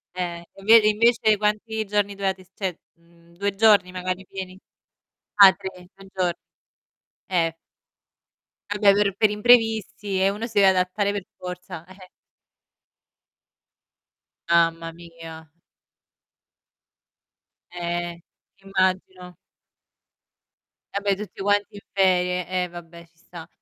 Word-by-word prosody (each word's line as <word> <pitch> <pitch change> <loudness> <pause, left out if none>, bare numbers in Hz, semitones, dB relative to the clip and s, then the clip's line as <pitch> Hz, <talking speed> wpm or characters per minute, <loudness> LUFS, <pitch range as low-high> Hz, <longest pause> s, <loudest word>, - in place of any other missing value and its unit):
Eh. 175 -2 -4
Inve 220 +4 +6
invece 220 0 +3
quanti 215 +1 -1
giorni 205 0 -1
dovevate 190 -1 -2
st 185 - -30
cioè, 190 -3 -1 0.3
mhmm, 170 0 -25
2 200 +1 -1
giorni, 205 -4 +4
magari 185 +1 -4
pieni? 185 0 -8 0.8
Ah, 200 -2 +9
3, 180 -2 -10
3 195 0 -16
gior 180 -2 0 0.9
Eh. 165 -3 0 1.2
Vabbè, 205 -1 +4
per 200 -1 +1
per 215 - +4
imprevisti, 215 -3 +2
eh, 190 - +4
uno 210 +3 -4
si 230 - -10
deve 195 - +6
adattare 190 +2 0
per 200 -2 -5
forza, 180 -2 -8
eh. 185 0 -15 2.4
Mamma 165 -1 +2
mia. 165 -1 -12 2.2
Eh. 175 -1 -4 0.4
Immagino. 185 -1 -2 1.6
Vabbè, 200 -1 0
tutti 210 -1 -9
quanti 205 +1 0
in 205 - -8
ferie. 180 -2 +1 0.2
Eh, - - -3
vabbè, 170 0 -12
ci 165 - -37
sta. 165 -1 -12
190 Hz, 110 wpm, -23 LUFS, 175-205 Hz, 2.4 s, Ah